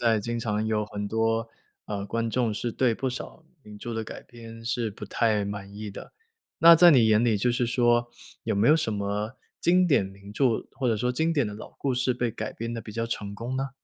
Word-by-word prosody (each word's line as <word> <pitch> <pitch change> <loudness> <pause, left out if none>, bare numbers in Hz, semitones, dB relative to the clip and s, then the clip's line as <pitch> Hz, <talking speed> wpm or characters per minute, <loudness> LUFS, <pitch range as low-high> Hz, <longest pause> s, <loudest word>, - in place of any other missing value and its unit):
在 115 -2 +3
经 120 +3 -3
常 105 -1 -1
有 105 -1 0
很 105 -1 -5
多， 115 +1 0 0.3
呃， 100 -1 -4
观 115 +2 -2
众 120 -2 +1
是 120 +2 -3
对 125 -1 +2
不 130 +3 -2
少 130 +5 -8 0.2
名 105 -3 -12
著 115 +3 -6
的 110 - -2
改 110 - -8
编 115 -1 -12
是 115 -1 -1
不 105 +1 -9
太 105 -1 +1
满 100 -1 -6
意 105 0 -6
的。 - - -11 0.5
那 170 0 +10
在 175 +1 +8
你 125 -7 +6
眼 110 0 +4
里 115 -3 +3
就 120 +4 +1
是 120 0 0
说， 120 0 +2 0.3
有 - - 0
没 100 +3 +2
有 150 - +7
什 155 -8 0
么 105 +4 -3 0.2
经 180 +1 +4
典 140 - +3
名 100 +1 -12
著， 120 0 +1
或 130 -3 -1
者 115 - +2
说 125 +4 0
经 160 +6 +1
典 145 -7 +1
的 105 - -5
老 105 - -9
故 135 -2 -1
事 125 0 +1
被 120 -1 -1
改 - - -5
编 115 +1 -4
得 115 - -4
比 110 - -10
较 115 +2 -2
成 105 -3 -4
功 120 +4 -5
呢？ 135 +1 -2
115 Hz, 255 characters per minute, -26 LUFS, 105-125 Hz, 0.5 s, 那